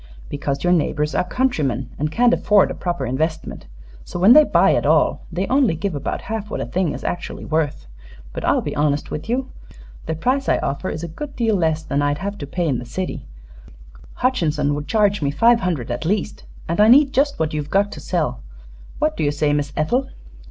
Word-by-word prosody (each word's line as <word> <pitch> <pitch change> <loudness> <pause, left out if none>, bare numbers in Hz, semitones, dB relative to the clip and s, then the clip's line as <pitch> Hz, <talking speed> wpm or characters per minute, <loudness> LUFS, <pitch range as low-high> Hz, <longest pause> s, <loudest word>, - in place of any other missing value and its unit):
"Because 140 -1 -3
your 180 0 +3
neighbors 150 -2 0
are - - +1
countrymen, 145 - -1
and 150 +1 -1
can't 245 +6 +3
afford 205 -2 +3
a - - -3
proper 175 -7 -3
investment. 155 +6 -3 0.4
So - - -7
when 190 +7 +7
they 305 - +8
buy - - +3
at - - +1
all - - +2
they 180 +3 -1
only 260 -8 +2
give 195 +3 -3
about 140 -2 -3
half 220 -2 -5
what - - -4
a - - -2
thing 180 -5 -1
is - - -8
actually 175 - -4
worth. 155 - -1 0.5
But - - -5
I'll - - +2
be - - -4
honest 145 0 0
with 155 +8 -5
you. 255 +2 -1 0.6
The 160 - -1
price 255 - 0
I - - +3
offer 140 +7 -3
is 155 - -5
a - - -3
good 275 - -8
deal 225 -3 +1
less 160 -3 0
than 140 -2 -1
I'd 145 0 +1
have 200 +4 -5
to 145 - -6
pay 175 +3 -2
in 130 -5 0
the - - -6
city 185 +8 -5 0.9
Hutchinson 155 - 0
would 145 +1 -4
charge 205 -3 +2
me 140 - +1
five 230 +12 +4
hundred, 165 - -2
at 120 - -3
least 195 +4 -2 0.2
and 170 +5 +1
I 210 - +6
need 275 +4 +6
just 280 +2 +1
what 160 -1 -1
you've 150 -1 -3
got 200 +3 +2
to - - -8
sell. 165 - -2 0.6
What 310 0 0
do - - -2
you 145 - +2
say, 145 0 0
Miss 145 -1 -1
Ethel?" 250 +13 0
170 Hz, 215 wpm, -21 LUFS, 150-215 Hz, 0.9 s, they